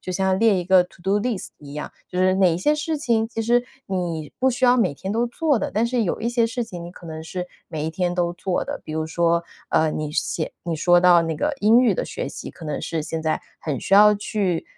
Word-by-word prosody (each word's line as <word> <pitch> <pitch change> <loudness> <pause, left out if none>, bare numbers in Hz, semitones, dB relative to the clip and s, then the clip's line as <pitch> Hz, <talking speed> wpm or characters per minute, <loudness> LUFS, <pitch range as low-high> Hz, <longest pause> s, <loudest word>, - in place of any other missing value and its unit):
就 185 - -5
像 190 0 +1
列 225 -2 +4
一 180 -2 -1
个 185 -1 +5
to 175 - -20
do 195 +3 +2
list 220 -3 -2
一 145 -1 -11
样。 150 - -5 0.2
就 180 - -2
是 185 0 +3
哪 185 -4 +4
一 - - -1
些 295 +12 +2
事 305 +1 -1
情， 230 -6 +1
其 225 -1 -4
实 240 +2 +2 0.2
你 170 -5 -3
不 260 +1 +3
需 255 0 0
要 250 0 +6
每 185 - +2
天 190 +7 -5
都 235 +2 +1
做 285 +1 +1
的， - - -3
但 220 +2 +2
是 235 -2 0
有 175 - -2
一 235 - 0
些 235 -1 +2
事 240 +1 -3
情 175 -6 -7
你 175 - -9
可 175 - -14
能 160 -1 -7
是 180 +1 -5 0.2
每 155 -1 -4
一 160 - -1
天 175 +1 -1
都 175 -1 0
做 180 +1 -2
的。 - - -5
比 155 - -7
如 160 0 -1
说， 170 +1 +1 0.3
呃， 160 -1 +3
你 150 -1 -4
写 160 0 -2
你 170 -2 -3
说 175 +2 +4
到 175 -1 +6
那 165 -1 -2
个 295 - -1
英 225 +4 +5
语 255 - +3
的 - - -2
学 - - -5
习， - - -8
可 165 - -11
能 150 -2 -3
是 160 -2 -3
现 160 +1 -4
在 155 0 -1 0.2
很 145 -6 -3
需 - - -5
要 210 +1 +8
去 200 -4 -1
185 Hz, 305 characters per minute, -23 LUFS, 165-225 Hz, 0.3 s, 要